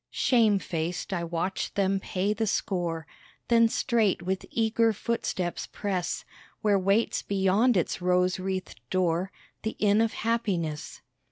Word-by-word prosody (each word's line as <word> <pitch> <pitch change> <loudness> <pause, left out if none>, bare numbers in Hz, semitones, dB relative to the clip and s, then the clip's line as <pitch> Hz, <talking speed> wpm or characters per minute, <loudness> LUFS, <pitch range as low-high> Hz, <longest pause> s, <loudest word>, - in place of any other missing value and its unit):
Shame 225 -5 +3
faced 175 +1 -3
I 175 -2 -1
watch 170 +3 -2
them 195 -1 +2
pay 195 +2 -1
the 220 0 -1
score, 175 -6 -1 0.4
Then 230 -1 +5
straight 220 -7 +1
with 190 +1 -2
eager 225 0 +2
footsteps 190 -5 -2
press 190 -4 -3 0.4
Where 205 -3 +3
waits 195 +4 +2
beyond 200 +4 +2
its 175 - -1
rose 180 0 +2
wreathed 190 0 -4
door 185 0 +1 0.3
The 220 - -3
Inn 210 +1 +3
of 225 -1 +1
Happiness. 195 -10 -2
195 Hz, 135 wpm, -27 LUFS, 180-220 Hz, 0.4 s, Then